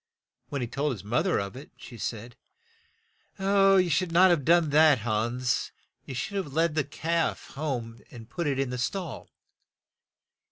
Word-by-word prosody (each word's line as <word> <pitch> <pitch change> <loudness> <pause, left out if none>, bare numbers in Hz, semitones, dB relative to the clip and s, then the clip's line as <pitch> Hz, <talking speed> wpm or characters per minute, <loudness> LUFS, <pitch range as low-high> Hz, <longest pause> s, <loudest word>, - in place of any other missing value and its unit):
When 140 -2 -3
he 120 - -2
told 140 +4 -1
his 100 -5 -9
moth 120 - 0
er 180 - +2
of 100 +3 -4
it, 140 +4 -10
she 120 - -11
said, 115 +3 -5 1.0
"You 195 -1 +4
should 175 +1 0
not 180 +2 +6
have 165 -5 +2
done 165 0 +3
that, 155 -1 +6
Hans, 120 +3 -1 0.4
you 135 - -6
should 200 +11 -3
have 175 -8 -4
led 165 +1 +2
the 155 -1 +1
calf 165 +3 -2
home 125 -6 -4
and 115 -2 -11
put 170 +6 -3
it 140 -2 0
in 135 -2 -1
the 125 - -4
stall." 175 +7 -4
145 Hz, 170 wpm, -27 LUFS, 120-170 Hz, 1.0 s, not